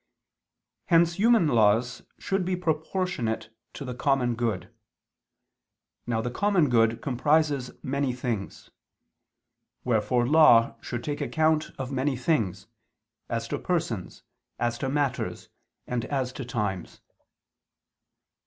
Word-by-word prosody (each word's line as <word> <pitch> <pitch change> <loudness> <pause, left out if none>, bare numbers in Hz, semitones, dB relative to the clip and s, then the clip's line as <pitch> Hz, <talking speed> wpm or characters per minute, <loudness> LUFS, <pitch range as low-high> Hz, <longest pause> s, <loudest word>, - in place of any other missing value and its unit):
Hence 170 -1 +4
human 225 -3 +5
laws 115 0 +2 0.2
should 195 -1 -1
be 180 +1 -1
proportionate 155 - -2 0.2
to 140 - -7
the 125 - -4
common 125 -2 +1
good. 110 -3 -3 1.3
Now 115 -2 0
the 120 +2 -3
common 190 -1 +2
good 115 -2 +2
comprises 145 0 +1
many 140 0 -1
things. 120 -5 -5 1.1
Wherefore 120 +1 +1
law 145 -6 +6
should 120 -1 -5
take 145 -1 -3
account 155 0 +1
of 130 0 -5
many 135 0 0
things, 120 - 0 0.6
as 115 0 -2
to - - -2
persons, 155 - -3 0.3
as 120 0 -1
to 135 - -2
matters, 140 -3 -2 0.4
and 125 -2 -2
as 130 -3 -2
to 130 0 -6
times. 105 -7 -3
125 Hz, 115 wpm, -26 LUFS, 115-155 Hz, 1.3 s, law